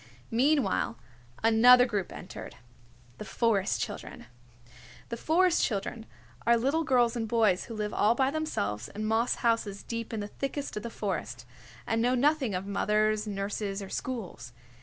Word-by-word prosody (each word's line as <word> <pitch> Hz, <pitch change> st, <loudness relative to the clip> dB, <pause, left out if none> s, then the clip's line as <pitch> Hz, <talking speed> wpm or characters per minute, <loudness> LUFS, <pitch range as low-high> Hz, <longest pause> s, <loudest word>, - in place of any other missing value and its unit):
Meanwhile, 240 Hz, -, +2 dB, 0.5 s
another 245 Hz, +3 st, +7 dB
group 205 Hz, -7 st, -2 dB
entered, -, -, -9 dB, 0.6 s
the -, -, -5 dB
Forest 215 Hz, -3 st, 0 dB
Children. -, -, -6 dB, 0.8 s
The 235 Hz, -, -3 dB
Forest 345 Hz, +6 st, +3 dB
Children 220 Hz, +1 st, -3 dB, 0.4 s
are 235 Hz, 0 st, +4 dB
little 275 Hz, +8 st, +1 dB
girls 250 Hz, -5 st, +3 dB
and 225 Hz, -2 st, -2 dB
boys 215 Hz, -5 st, +2 dB
who 230 Hz, -, -8 dB
live 210 Hz, -1 st, -3 dB
all 220 Hz, +3 st, +3 dB
by 265 Hz, +1 st, +2 dB
themselves 195 Hz, -, -2 dB
in 215 Hz, +1 st, -5 dB
moss 225 Hz, +2 st, +1 dB
houses 225 Hz, -4 st, 0 dB
deep 230 Hz, 0 st, -5 dB
in 225 Hz, -, -3 dB
the 205 Hz, -, -4 dB
thickest 275 Hz, +5 st, -4 dB
of 210 Hz, -, -3 dB
the 235 Hz, -, -5 dB
forest, 200 Hz, -, -4 dB, 0.4 s
and 225 Hz, 0 st, 0 dB
know 250 Hz, +2 st, +2 dB
nothing 270 Hz, -5 st, +2 dB
of 185 Hz, +1 st, -3 dB
mothers, 215 Hz, +1 st, +1 dB
nurses 200 Hz, 0 st, -3 dB
or 195 Hz, -1 st, -7 dB
schools. 190 Hz, -, -5 dB
225 Hz, 155 wpm, -29 LUFS, 205-250 Hz, 0.8 s, another